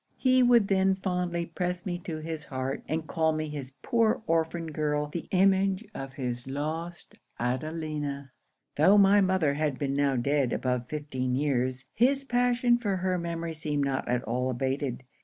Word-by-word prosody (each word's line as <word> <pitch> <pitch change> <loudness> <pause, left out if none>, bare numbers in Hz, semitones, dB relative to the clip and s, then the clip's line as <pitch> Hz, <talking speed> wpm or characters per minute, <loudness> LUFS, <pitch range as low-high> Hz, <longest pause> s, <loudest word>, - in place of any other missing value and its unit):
He 255 -1 +4
would 240 -4 +5
then 190 -1 +3
fondly 180 -2 -2
press 180 +1 -3
me 175 -2 -2
to 160 -3 -4
his 155 -1 -5
heart, 130 0 -3
and 160 0 -2
call 160 -1 +1
me 155 0 -3
his 140 -3 -6
poor 225 -2 +2
orphan 165 0 0
girl, 150 -1 0
the 155 +3 -6
image 195 +2 +3
of 135 0 -6
his 125 -2 -4
lost 160 +5 -5 0.2
Adelina! 145 +1 -3 0.5
'Tho' 185 +8 +6
my 200 0 +6
mother 185 -6 +2
had 145 -2 -1
been 140 -1 -1
now 140 -1 +2
dead 135 0 +1
above 125 -1 -1
fifteen 130 -4 -2
years, 130 -2 0
his 270 +4 +3
passion 245 -1 +2
for 200 -5 -1
her 185 0 0
memory 170 -1 -3
seemed 150 -2 -1
not 135 -1 -2
at 125 0 0
all 125 +3 -1
abated. 130 0 -2
155 Hz, 165 wpm, -28 LUFS, 135-185 Hz, 0.5 s, Tho